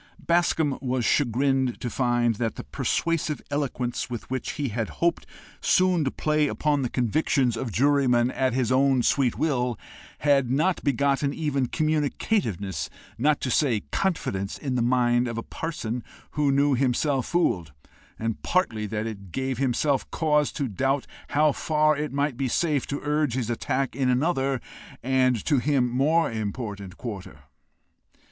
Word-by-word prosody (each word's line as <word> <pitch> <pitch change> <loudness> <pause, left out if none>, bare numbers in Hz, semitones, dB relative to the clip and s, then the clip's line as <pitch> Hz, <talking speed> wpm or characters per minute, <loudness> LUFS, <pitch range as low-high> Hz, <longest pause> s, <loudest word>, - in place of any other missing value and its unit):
Bascombe 165 -4 +1
was 125 -3 -1
chagrined 130 0 +1
to - - -4
find 120 -1 +1
that 115 -1 -2
the - - -6
persuasive 165 -2 -1
eloquence 130 -5 -2
with 120 0 -6
which 130 - -2
he 145 -3 -2
hoped 120 +10 -1 0.3
soon 185 -3 +3
to 135 - +1
play 150 +2 +1
upon 145 0 0
the 125 - -1
convictions 125 0 +1
of 115 0 -4
jurymen 130 -1 +3
at 130 -2 0
his 130 -2 +1
own 130 -1 +3
sweet 130 -2 +2
will, 125 -7 0 0.4
had 140 -4 +3
not 160 +8 +1
begotten 140 0 +1
even 140 -5 0
communicativenes, 145 - -1 0.3
not 145 +3 +3
to 130 - -1
say 120 -8 +2
confidence, 100 - -1
in 135 -3 -3
the 125 - +1
mind 120 0 +2
of 115 -1 -4
a 115 - -3
parson 125 -8 -4 0.3
who 145 -1 +1
knew 140 +1 +3
himself 135 +1 +1
fooled, 90 - 0 0.5
and 115 -1 -3
partly 110 - 0
that 105 +1 -3
it 100 -5 -7
gave 130 +2 -2
him 135 -2 +2 0.4
cause 150 -2 +1
to 140 -4 -2
doubt 135 +6 0 0.2
how 150 +1 +3
far 155 +1 +2
it 150 +1 -3
might 140 0 0
be 135 +2 -1
safe 145 0 0
to 140 - -3
urge 150 -4 0
his 120 -3 -1
attack 130 +3 -1
in 130 -1 +1
another 135 0 +1 0.4
and 130 -2 +2
to 145 -5 +3
him 135 -2 +2
more 150 +6 +2
important 100 -3 -5
quarter. 105 -6 -7
130 Hz, 155 wpm, -25 LUFS, 120-150 Hz, 0.5 s, soon